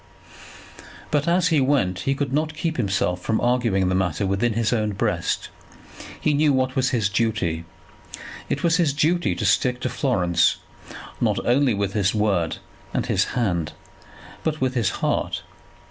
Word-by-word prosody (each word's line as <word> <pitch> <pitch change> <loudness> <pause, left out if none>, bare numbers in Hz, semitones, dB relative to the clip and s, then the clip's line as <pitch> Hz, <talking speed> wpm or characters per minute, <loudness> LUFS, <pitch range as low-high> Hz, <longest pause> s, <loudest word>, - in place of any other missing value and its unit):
But 145 0 +1
as 175 +1 +3
he 155 -4 +3
went 130 -10 +1
he 135 - 0
could 140 -1 -2
not 155 +1 0
keep 160 0 -2
himself 95 -5 0
from 110 +4 0
arguing 120 -6 +1
the 90 - +1
matter 95 -1 0
within 100 +5 0
his 115 +1 0
own 105 -3 0
breast. 100 - -1 0.7
He 150 - +1
knew 150 +1 +3
what 130 -1 0
was 130 -1 +2
his 115 -6 +1
duty. 100 -6 -1 0.8
It - - -2
was 170 -1 +3
his 165 -6 +2
duty 155 - +1
to - - -3
stick 125 -1 +2
to - - -1
Florence, 90 - +2 0.7
not - - +2
only 125 -1 +3
with 100 -1 -2
his 100 -1 +1
word 100 -6 +1 0.4
and - - 0
his - - +1
hand, 90 -9 0 0.7
but 155 -1 -1
with 130 -1 0
his 115 -7 +1 0.2
heart. - - -1
120 Hz, 160 wpm, -23 LUFS, 95-145 Hz, 0.8 s, as